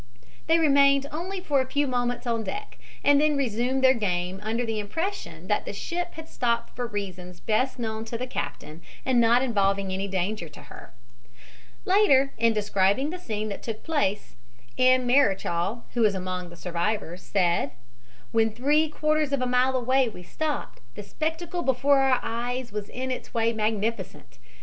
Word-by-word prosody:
They 325 +1 +5
remained 280 -3 +4
only 365 +5 -4
for 285 -6 +2
a 260 - -3
few 285 +2 +1
moments 245 -2 -1
on 230 -2 0
deck, 415 - -6 0.2
and 285 0 +5
then 300 -1 +2
resumed 255 +1 0
their 260 0 +7
game 185 -4 -2
under 225 +3 -1
the 225 -1 -2
impression 330 - -4
that - - 0
the - - -6
ship 350 0 -4
had 320 0 -9
stopped 235 -4 -1
for 245 -1 -3
reasons 185 -4 -6
best 255 +5 0
known 220 -2 -3
to 230 +1 -4
the 250 - -3
captain 165 -9 -6 0.2
and 255 -2 +3
not 235 +2 +4
involving 200 -5 +1
any 195 +1 -2
danger 190 -1 -2
to 150 - -13
her. - - -12 0.9
Later, 365 -10 +4
in 230 0 +4
describing 210 +5 +1
the 365 - -6
scene 215 -8 -3
that 200 - -6
took 225 -2 -6
place, 280 -11 -1 0.4
M. 255 0 +4
Marechal, 215 -5 +2
who 240 - 0
was 210 -3 +4
among 185 -1 -4
the 170 - -12
survivors, 180 +1 -2
said: 175 -7 +1 0.6
"When 225 -1 +3
three 295 +7 +2
quarters 305 -1 0
of 280 -2 0
a - - +1
mile 250 +1 +2
away 255 0 +2
we 180 -5 -11
stopped, 305 - -4 0.2
the - - -7
spectacle 325 +2 -3
before 275 0 +3
our 265 -2 +3
eyes 245 +2 -3
was 210 -1 -5
in 260 +1 -4
its 255 - -6
way 230 0 +2
magnificent. 220 +1 -3
240 Hz, 175 wpm, -26 LUFS, 210-275 Hz, 0.9 s, their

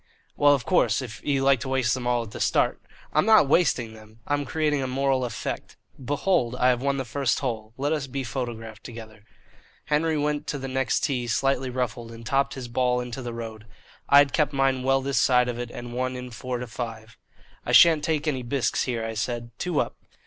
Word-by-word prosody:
"Well, 145 0 +5
of 130 - -5
course, 180 -6 +2
if 110 -5 -9
you 140 -2 +1
like 135 -1 +4
to 130 +2 -5
waste 130 -2 +1
them 125 -2 -3
all 120 -1 +1
at 110 - -11
the - - -8
start - - +1 0.2
" - - -25
"I'm 155 +7 +3
not 220 -9 +6
wasting 130 -8 +2
them, 110 0 -16
I'm 145 0 -1
creating 150 0 0
a 130 - -2
moral 135 0 +1
effect. 120 - -5 0.3
Behold, 145 -2 +1
I 125 0 +3
have 125 -1 +1
won 140 0 0
the 135 - -3
first 130 +2 0
hole; 110 -5 -3
let 145 +3 0
us 150 -3 -2
be 135 +1 -4
photographed 115 -3 -5
together." 110 -3 -10 0.6
Henry 155 +1 +1
went 150 0 -1
to 145 - -2
the 135 -1 -5
next 130 -1 0
tee 125 -4 -1
slightly 135 +2 +1
ruffled 120 -2 -3
and 115 0 -11
topped 135 +4 +1
his 130 -2 -6
ball 125 +1 +1
into 125 +1 -5
the 120 -1 -5
road. 115 -1 -7 0.4
I 140 - +7
had 140 -1 +5
kept 150 -2 +1
mine 135 -1 +2
well 135 +1 +2
this 140 0 +1
side 125 -1 +4
of 120 -1 -3
it 120 -1 -4
and 120 0 -8
won 130 +1 -2
in 125 0 -7
four 125 +2 -4
to 125 - -5
five. 115 -1 -7 0.5
"I - - -3
shan't 160 -3 +7
take 155 -1 -1
any 135 -4 0
bisques 125 +1 0
here," 115 -3 -2
I 115 - -4
said. 115 +1 -3
"Two 175 -5 0
up." - - -2
130 Hz, 220 wpm, -25 LUFS, 120-140 Hz, 0.6 s, I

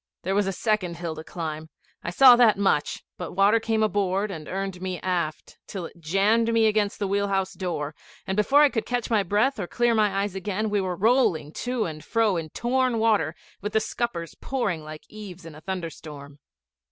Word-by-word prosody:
There 190 - -1
was 200 0 +2
a - - 0
second 190 -4 -1
hill 170 -1 -4
to 155 0 -8
climb; 160 -2 -6 0.3
I - - -3
saw 250 +7 +8
that 235 -4 +5
much: 195 -7 0 0.2
but 180 - -3
the - - -8
water 200 +4 +4
came 225 -1 0
aboard 200 -1 0
and 155 -4 -7
earned 190 -1 -4
me 185 -1 -3
aft 175 -4 -3
till 190 -4 -5
it 170 - -12
jammed 200 +8 +2
me 225 -1 +3
against 210 -1 +1
the 200 - -2
wheel 200 +1 0
house 195 -1 -1
door, 165 -6 -3 0.3
and 190 - -2
before 270 +8 +4
I 295 - +6
could 225 -4 -3
catch 245 -1 -2 0.2
breath 215 +5 +2
or 180 - -3
clear 240 +3 +1
my 205 -3 +2
eyes 205 -2 -3
again 205 +2 -2
we 205 -1 +2
were 185 -1 -2
rolling 210 - +2
to 245 -2 -2
and 155 -2 -6
fro 225 -4 +1
in 165 -2 -3
torn 250 - 0
water, 215 -8 +2 0.3
with 210 +1 -4
the 220 - +4
scuppers 220 -7 -3
pouring 200 -12 -2
like 155 0 -9
eaves 190 -5 -10
in 165 - -9
a 150 - -13
thunderstorm. 155 -6 -7
195 Hz, 205 wpm, -25 LUFS, 170-220 Hz, 0.3 s, saw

